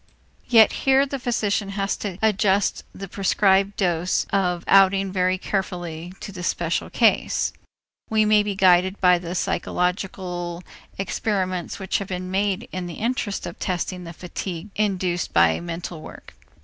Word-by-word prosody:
Yet 225 Hz, -3 st, +6 dB, 0.2 s
here 270 Hz, +1 st, +5 dB
the 275 Hz, 0 st, -5 dB
physician 215 Hz, -5 st, -1 dB
has 195 Hz, 0 st, 0 dB
to 195 Hz, -4 st, -5 dB
adjust 205 Hz, -2 st, +2 dB
the 195 Hz, -, -8 dB
prescribed 195 Hz, +1 st, +2 dB
dose 175 Hz, -2 st, +1 dB
of 180 Hz, -3 st, +1 dB
outing 195 Hz, 0 st, +5 dB
very 185 Hz, 0 st, +1 dB
carefully 175 Hz, -4 st, -4 dB
to 200 Hz, -, -6 dB
the 185 Hz, -2 st, -8 dB
special 170 Hz, -1 st, -1 dB
case. -, -, +2 dB, 0.6 s
We 220 Hz, -1 st, +3 dB
may 210 Hz, 0 st, +5 dB
be 205 Hz, -1 st, -3 dB
guided 185 Hz, 0 st, +4 dB
by 180 Hz, -1 st, +5 dB
the 175 Hz, +1 st, -6 dB
psychological 180 Hz, -1 st, -2 dB, 0.3 s
experiments 185 Hz, -1 st, -2 dB
which 190 Hz, -2 st, -1 dB
have 200 Hz, -, -5 dB
been 185 Hz, 0 st, -5 dB
made 195 Hz, 0 st, 0 dB
in 185 Hz, -1 st, -4 dB
the 170 Hz, -, -7 dB
interest 230 Hz, -3 st, -2 dB
of 170 Hz, -, -8 dB
testing 180 Hz, 0 st, -3 dB
the 165 Hz, -, -8 dB
fatigue 180 Hz, +2 st, -6 dB
induced 185 Hz, -4 st, -1 dB
by 85 Hz, -1 st, +4 dB
mental 170 Hz, -1 st, -6 dB
work. -, -, -12 dB
185 Hz, 150 wpm, -23 LUFS, 175-200 Hz, 0.6 s, Yet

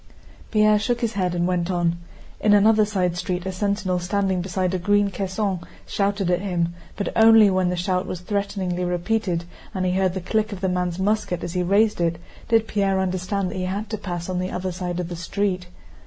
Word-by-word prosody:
Pierre 215 Hz, -1 st, +4 dB
shook 240 Hz, +3 st, -1 dB
his 230 Hz, -1 st, 0 dB
head 180 Hz, -3 st, 0 dB
and 175 Hz, 0 st, +1 dB
went 180 Hz, -1 st, 0 dB
on. 170 Hz, -2 st, 0 dB, 0.4 s
In 210 Hz, -, +4 dB
another 215 Hz, +1 st, +5 dB
side 185 Hz, -4 st, 0 dB
street 180 Hz, 0 st, -3 dB
a 190 Hz, -, -2 dB
sentinel 190 Hz, -1 st, -1 dB
standing 190 Hz, 0 st, 0 dB
beside 185 Hz, 0 st, -1 dB
a 185 Hz, -, 0 dB
green 205 Hz, +2 st, +2 dB
caisson 195 Hz, 0 st, -2 dB, 0.3 s
shouted 200 Hz, -2 st, 0 dB
at 175 Hz, 0 st, +1 dB
him, 175 Hz, -4 st, -1 dB, 0.2 s
but 200 Hz, -, -2 dB
only 225 Hz, -2 st, +7 dB
when 185 Hz, -1 st, +2 dB
the 180 Hz, -, -1 dB
shout 180 Hz, +1 st, -1 dB
was 180 Hz, -, -5 dB
threateningly 190 Hz, -2 st, -2 dB
repeated 180 Hz, 0 st, -1 dB, 0.3 s
and 185 Hz, -1 st, 0 dB
he 180 Hz, -, +2 dB
heard 185 Hz, 0 st, +1 dB
the -, -, -1 dB
click 220 Hz, +4 st, 0 dB
of 195 Hz, -2 st, -6 dB
the 190 Hz, -, +1 dB
man's 180 Hz, -1 st, -1 dB
musket 190 Hz, -3 st, 0 dB
as 175 Hz, -, -4 dB
he 180 Hz, -, 0 dB
raised 200 Hz, +2 st, +2 dB
it 170 Hz, -1 st, +1 dB, 0.3 s
did 225 Hz, -1 st, +3 dB
Pierre 195 Hz, -2 st, +1 dB
understand 185 Hz, +1 st, -1 dB
that -, -, -5 dB
he 185 Hz, -, -2 dB
had 200 Hz, +4 st, -3 dB
to 215 Hz, -, -1 dB
pass 175 Hz, -4 st, -4 dB
on 185 Hz, -1 st, -2 dB
the 185 Hz, 0 st, -2 dB
other 185 Hz, 0 st, -3 dB
side 180 Hz, 0 st, -4 dB
of 180 Hz, -, -2 dB
the 175 Hz, -, -5 dB
street. 185 Hz, +2 st, -2 dB
185 Hz, 215 wpm, -23 LUFS, 180-205 Hz, 0.4 s, only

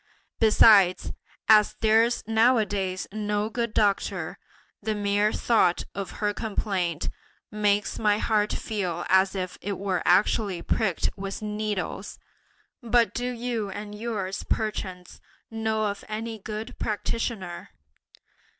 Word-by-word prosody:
Besides, 210 Hz, -4 st, +6 dB, 0.4 s
as 215 Hz, -1 st, +6 dB
there's 225 Hz, +2 st, +3 dB
nowadays 215 Hz, -5 st, +2 dB
no 210 Hz, 0 st, -2 dB
good 235 Hz, 0 st, -2 dB
doctor, 195 Hz, -3 st, 0 dB, 0.4 s
the 215 Hz, +1 st, -1 dB
mere 205 Hz, +1 st, +1 dB
thought 210 Hz, -8 st, +2 dB
of 195 Hz, -1 st, -4 dB
her 205 Hz, -1 st, -1 dB
complaint 195 Hz, -7 st, -2 dB, 0.4 s
makes 210 Hz, -1 st, +1 dB
my 210 Hz, -2 st, +3 dB
heart 210 Hz, -1 st, +1 dB
feel 180 Hz, -6 st, -3 dB
as 190 Hz, +1 st, +4 dB
if 185 Hz, -1 st, -4 dB
it 200 Hz, 0 st, -3 dB
were 190 Hz, -2 st, -1 dB
actually 185 Hz, 0 st, +2 dB
pricked 195 Hz, -7 st, 0 dB
with 195 Hz, +1 st, -6 dB
needles! 210 Hz, -2 st, -3 dB, 0.6 s
But 235 Hz, -1 st, +2 dB
do 245 Hz, +1 st, -2 dB
you 235 Hz, -3 st, -3 dB
and 205 Hz, +1 st, -7 dB
yours, 210 Hz, -3 st, -3 dB
perchance, 185 Hz, -4 st, -3 dB, 0.3 s
know 220 Hz, -1 st, -1 dB
of 200 Hz, -1 st, -3 dB
any 220 Hz, +1 st, -4 dB
good 215 Hz, +3 st, -7 dB
practitioner?" 210 Hz, -4 st, -3 dB
210 Hz, 115 wpm, -26 LUFS, 195-220 Hz, 0.6 s, Besides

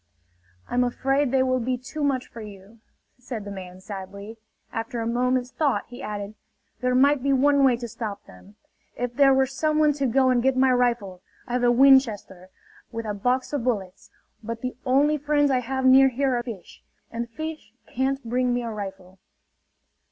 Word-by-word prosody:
"I'm 250 Hz, 0 st, +1 dB
afraid 270 Hz, +3 st, 0 dB
they 260 Hz, 0 st, +2 dB
will 255 Hz, 0 st, +1 dB
be 250 Hz, +1 st, -1 dB
too 275 Hz, +5 st, -6 dB
much 265 Hz, -3 st, 0 dB
for 230 Hz, -, -11 dB
you," 205 Hz, +1 st, -12 dB, 0.4 s
said 240 Hz, -4 st, -6 dB
the 200 Hz, -, -7 dB
man 185 Hz, -1 st, -9 dB
sadly. 200 Hz, +2 st, -8 dB, 0.4 s
After 225 Hz, +1 st, -4 dB
a 225 Hz, -, -2 dB
moment's 250 Hz, +2 st, 0 dB
thought 290 Hz, -4 st, 0 dB
he 245 Hz, +2 st, -10 dB
added: 205 Hz, 0 st, -5 dB, 0.5 s
"There 250 Hz, 0 st, 0 dB
might 280 Hz, +1 st, +4 dB
be 275 Hz, +1 st, +1 dB
one 280 Hz, +1 st, +3 dB
way 255 Hz, -3 st, +4 dB
to 240 Hz, 0 st, -6 dB
stop 215 Hz, -2 st, -6 dB
them. 90 Hz, +2 st, -17 dB, 0.4 s
If 245 Hz, 0 st, -3 dB
there 275 Hz, +2 st, +5 dB
were 265 Hz, 0 st, +4 dB
someone 305 Hz, +3 st, +1 dB
to 280 Hz, -1 st, -1 dB
go 260 Hz, +2 st, +3 dB
and 245 Hz, -1 st, +2 dB
get 265 Hz, +1 st, +1 dB
my 260 Hz, 0 st, +4 dB
rifle... 235 Hz, -7 st, 0 dB, 0.2 s
I 240 Hz, -, -7 dB
have 250 Hz, 0 st, 0 dB
a 240 Hz, -, +5 dB
Winchester, 240 Hz, -8 st, +3 dB, 0.4 s
with 230 Hz, -1 st, -5 dB
a 210 Hz, -, -2 dB
box 250 Hz, +7 st, -1 dB
of 285 Hz, -5 st, -1 dB
bullets... 200 Hz, -7 st, -3 dB, 0.3 s
but 230 Hz, +1 st, -6 dB
the 255 Hz, -1 st, -4 dB
only 290 Hz, +4 st, +3 dB
friends 290 Hz, 0 st, +2 dB
I 255 Hz, -, +2 dB
have 265 Hz, +2 st, -3 dB
near 265 Hz, +1 st, +7 dB
here 265 Hz, +1 st, 0 dB
are 240 Hz, -, 0 dB
fish... 230 Hz, -7 st, -10 dB, 0.3 s
and 235 Hz, +1 st, -4 dB
fish 315 Hz, 0 st, -7 dB
can't 270 Hz, +2 st, -2 dB
bring 250 Hz, +1 st, +1 dB
me 245 Hz, -, -2 dB
a 230 Hz, -, -4 dB
rifle!" 190 Hz, -3 st, -8 dB
250 Hz, 190 wpm, -24 LUFS, 220-265 Hz, 0.5 s, near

